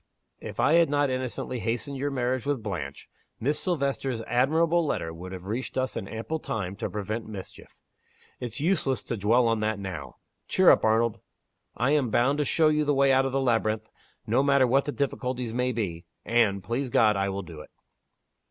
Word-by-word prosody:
If - - -8
I 155 - +4
had 170 -2 +5
not 145 -1 +2
innocently 130 -1 -3
hastened 120 +5 -2
your 140 +2 -1
marriage 130 -2 -1
with 140 -5 -2
Blanche, 85 -10 -5 0.3
Miss 145 +6 0
Silvester's 140 -8 -1
admirable 160 +9 +2
letter 80 - -2
would 90 +3 -9
have 95 -1 -8
reached 115 +7 -4
us 130 0 -1
in 95 - -4
ample 115 +10 -4
time 95 -9 -4
to - - -3
prevent 105 +2 -4
mischief. 100 -4 -10 0.6
It's 120 -2 -5
useless 145 -5 +1
to 120 - -3
dwell 115 +4 +3
on 115 -1 +1
that 110 0 0
now. 95 -8 -6 0.3
Cheer - - +6
up, - - +3
Arnold! 110 0 +2 0.6
I 125 +4 +2
am 145 -5 +2
bound 130 +6 +2
to 150 - +1
show 155 +3 +3
you 150 0 +2
the 145 -1 +1
way 135 0 +4
out 135 0 +3
of - - -3
the 135 - 0
labyrinth, 110 -4 0 0.4
no - - +2
matter 140 -1 +4
what 135 +3 +2
the 145 - -2
difficulties 125 -4 -2
may 125 +1 0
be 90 -8 -4 0.2
and, 105 -4 +2
please 120 +7 -2
God, 110 -3 +4
I 100 0 0
will 100 +1 -4
do 85 -3 -10
it!" - - -13
120 Hz, 195 wpm, -27 LUFS, 110-140 Hz, 0.6 s, Cheer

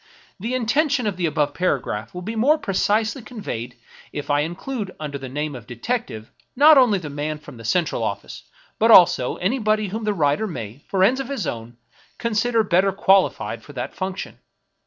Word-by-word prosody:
— - - -32
The 230 +6 -3
inten 255 +6 +1
tion 260 -4 0
of 205 -3 -1
the 175 -1 0
above 150 -2 0
paragraph 130 - -2
will 180 - -5
be 220 +5 -4
more 275 +8 +4
precisely 215 +3 0
conveyed 125 - -6 0.4
if 145 0 -4
I 145 - +3
include 190 - -4
under 145 -2 -5
the 135 -1 -7
name 150 +3 -3
of 120 -3 -10
detective 120 - -4 0.2
not 300 +4 +8
only 250 -7 +5
the 170 -5 -6
man 150 +2 -3
from 150 -4 -13
the 115 - -11
central 170 +9 0
office, - - -4 0.4
but 225 - +4
also 175 - +6
anybody 215 0 0
whom 220 +4 -4
the 210 -1 0
writer 150 +5 +1
may, 115 - -7
for 190 -1 +2
ends 250 +7 +4
of 270 -1 -4
his 270 -10 -3
own, 115 -1 -6 0.4
consider 230 0 +1
better 195 0 +3
qualified 195 -1 +2
for - - -13
that - - -5
function. 190 0 -5
190 Hz, 190 wpm, -22 LUFS, 145-225 Hz, 0.4 s, not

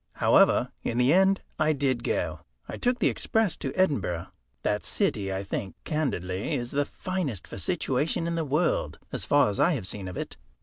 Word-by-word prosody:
However, - - +4
in 120 - -2
the 125 +4 +4
end 190 +1 +4 0.2
I 155 0 +3
did 130 -4 0
go. - - -1 0.3
I - - -5
took 245 0 +1
the - - +2
express 220 -5 +1
to 135 - -3
Edinburgh. 110 - 0 0.3
That 105 0 0
city, 105 - 0
I 95 +1 -2
think 95 -1 -4
candidly, 100 - -1
is 120 0 -3
the 145 +1 +1
finest 170 - -3
for - - -8
situation 155 - 0
in 170 - -1
the 165 -1 0
world, 150 +4 0
as - - -3
far 145 0 +4
as 100 - -5
I 175 - +4
have 120 -10 -3
seen 95 0 -4
of 90 - -6
it. - - -5
140 Hz, 190 wpm, -27 LUFS, 105-170 Hz, 0.3 s, However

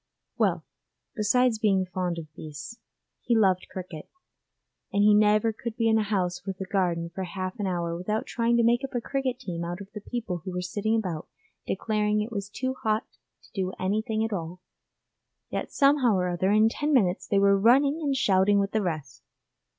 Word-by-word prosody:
Well, - - +1 0.5
besides 225 +2 +2
being 195 -3 +2
fond 180 -1 -3
of 155 -2 -8
beasts, 155 - -9 0.4
he 235 -2 +2
loved 190 -4 +2
cricket, 180 -4 -8 0.8
and 200 0 +2
he 210 0 +6
never 210 +1 +4
could 225 +1 -6
be 230 - +2
in 220 0 +4
a - - +2
house 190 -4 -1
with 190 -2 -5
a 190 - -3
garden 175 -3 -1
for 190 - -4
half 185 +3 -5
an 200 - -1
hour 170 -2 -2
without 210 +5 -2
trying 235 0 +1
to 235 - +3
make 240 +3 +3
up 270 -1 -5
a - - +2
cricket 260 +1 -2
team 180 -10 -5
out 175 +2 -4
of 200 0 -10
the 210 - -7
people 210 -6 -4
who 185 +3 -7
were 180 0 -2
sitting 205 +5 -1
about 180 -8 -2 0.4
declaring 210 +1 0
it 215 +3 -3
was 200 -2 -4
too 260 +5 -2
hot 215 +1 0 0.4
to - - -21
do 190 -3 -2
anything 215 +3 0
at 225 - -3
all; 175 -1 -5 0.9
yet - - -3
somehow 275 -6 +4
or 180 -1 0
other, 180 +2 0
in 215 +2 +5
ten 295 +6 -1
minutes 185 -7 +2
they 200 - +1
were 200 0 +5
running 275 +9 +4
and 280 -3 0
shouting 200 -5 +3
with 200 0 +1
the 220 - +1
rest. 155 -7 -4
205 Hz, 195 wpm, -27 LUFS, 185-225 Hz, 0.9 s, he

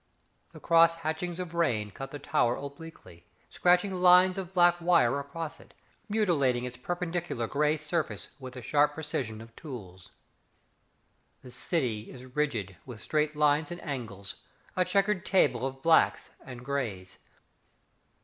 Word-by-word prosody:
The - - -12
cross 165 0 +5
hatchings 170 +3 -3
of 180 -2 -5
rain 115 -12 0
cut 135 +3 -7
the 145 - -7
Tower 140 -4 +1
obliquely, 140 - -11 0.2
Scratching 180 +2 +3
lines 180 +1 +5
of 185 -2 -6
black 175 -1 +4
wire 165 -7 +3
across 150 +3 -6
it, - - -18 0.3
Mutilating 145 - +1
its 125 0 -6
perpendicular 175 -2 -3
grey 150 +5 +1
surface 155 +1 -3
With 130 -1 -9
the 125 - -8
sharp 145 +3 +2
precision 130 -8 -4
of 115 0 -14
tools. 95 - -10 1.3
The 125 - -11
city 120 -5 -2
is 130 0 -12
rigid 110 - -1
with 120 -4 -10
straight 150 +5 -1
lines 150 0 +2
and 175 0 -6
angles, 110 - -6 0.4
A 185 - +3
chequered 200 -1 +1
table 130 -9 +2
of 135 0 -9
blacks 165 -1 +3
and 125 -1 -10
greys. 115 -10 -4
145 Hz, 140 wpm, -29 LUFS, 125-170 Hz, 1.3 s, cross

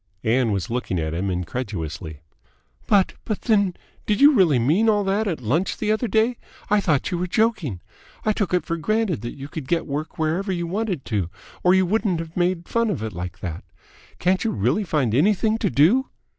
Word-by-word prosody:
Ann 120 0 +2
was 100 -1 -2
looking 120 -6 -2
at 80 0 -2
him 95 +4 -1
incredulously. 90 - -4 0.7
"But 200 -3 +3
but 215 - -3
then, 200 -6 +2 0.3
did 210 -1 +1
you 290 +2 +8
really 180 - +4
mean 160 - +3
all 205 -1 +3
that 200 +3 0
at 165 -8 -2
lunch 150 - 0
the 215 -1 0
other 220 +3 0
day? 225 +2 +2 0.3
I 210 -1 +4
thought 155 -8 +1
you 175 - -1
were 180 - -1
joking. 180 - 0 0.4
I 215 - +3
took 205 -3 -1
it 180 -1 +1
for 165 - -2
granted 215 - 0
that 120 - -6
you 140 0 -7
could 150 -2 -7
get 170 +2 0
work 150 +2 -4
whenever 165 +5 0
you 175 -2 -2
wanted 185 - -2
to 100 -7 -1 0.3
or 180 +1 +5
you 190 0 +4
wouldn't 200 -1 +1
have 165 0 -7
made 175 -1 0
fun 230 -1 +1
of 185 - -2
it 110 -2 -4
like 90 +1 -6
that! 85 -1 -5 0.5
Can't 185 +1 +1
you 225 - +1
really 125 - +1
find 145 - 0
anything 210 - +2
to 200 - +1
do?" 195 - +3
175 Hz, 205 wpm, -23 LUFS, -, 0.7 s, you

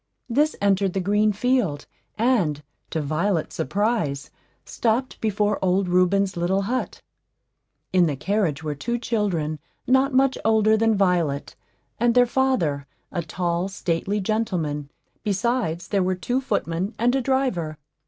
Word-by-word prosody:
This 295 +6 +2
entered 195 -2 +2
the 195 - 0
green 205 +3 +2
field, 210 - 0 0.3
and, 200 - +1 0.3
to 160 - -2
Violet's 160 +4 -1
surprise, 170 - -1 0.3
stopped 240 +3 -1
before 210 -1 0
old 185 +1 +2
Reuben's 185 +2 +2
little 180 +3 0
hut. 250 +6 -3 0.9
In 180 -2 +5
the 145 - -1
carriage 165 -1 -1
were 150 -1 -2
two 235 +12 -2
children 185 -10 -1 0.3
not 265 +2 +3
much 265 0 +2
older 220 -1 +4
than 225 0 +2
Violet, 175 -7 0 0.4
and 235 +1 +3
their 245 0 +6
father, 210 - 0 0.2
a 175 - -2
tall, 170 +2 -2
stately 195 +1 -2
gentleman; 180 -9 -2 0.3
besides, 205 -4 -1
there 200 -2 +1
were 185 0 +1
two 245 +9 -1
footmen 185 -5 -2
and 245 +3 +2
a 270 - +1
driver. 245 - 0
195 Hz, 135 wpm, -24 LUFS, 170-230 Hz, 0.9 s, their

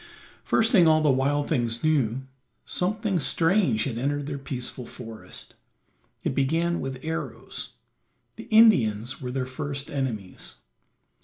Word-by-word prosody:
First 225 +1 +2
thing 180 -7 +6
all 155 0 +5
the 150 - +5
wild 140 +2 +1
things 120 -1 -1
knew, 135 -5 +1 0.4
something 200 0 0
strange 165 - +2
had 115 -2 -3
entered 145 +2 -1
their 140 -1 -4
peaceful 125 -2 -5
forest. 115 -2 -9 0.7
It - - 0
began 165 +5 +1
with 135 +1 -5
arrows; 160 +1 -5 0.6
the - - -9
Indians 130 - +4
were 125 - -4
their 130 0 -2
first 140 +1 -4
enemies. 120 -9 -4
140 Hz, 130 wpm, -26 LUFS, 125-165 Hz, 0.7 s, thing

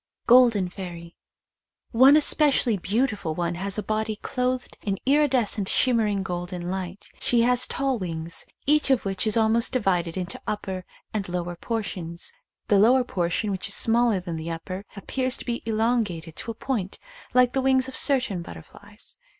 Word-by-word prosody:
Golden 235 -6 +5
Fairy. 175 -2 -9 0.8
One 265 +5 +7
specially 280 -6 +3
beautiful 200 -3 -1
one 175 0 -1
has 195 +3 -2
a 210 - -2
body 215 +1 -2
clothed 250 +3 -3
in 195 -2 -2
iridescent 255 -8 +2
shimmering 215 -6 +2
golden 175 -1 -4
light. 190 0 -6
She 235 -1 +2
has 250 +1 +3
tall 270 -3 -1
wings, 165 -2 -5 0.2
each 300 0 +2
of 265 -5 +2
which 195 +3 0
is 215 - +3
almost 225 +2 +2
divided 180 -8 0
into 180 0 -5
upper 190 -3 -4 0.3
and 200 -4 -3
lower 175 0 -3
portions. 175 -5 -4 0.3
The 205 - +4
lower 250 +5 +5
portion, 185 -1 -1
which 190 0 -1
is 200 - 0
small 235 +1 +3
er 195 - 0
than 175 -2 -5
the 160 +1 -5
upper, 185 +4 -6
appears 255 +5 -1
to - - -8
be 240 -1 -3
elongated 215 -8 -1
to - - -5
a 230 - -4
point 215 -7 -3 0.4
like 250 -1 +4
the 270 - +1
wings 260 0 +2
of 265 - -7
certain 250 -10 +2
butterflies. 80 - -12
210 Hz, 165 wpm, -25 LUFS, 180-245 Hz, 0.8 s, One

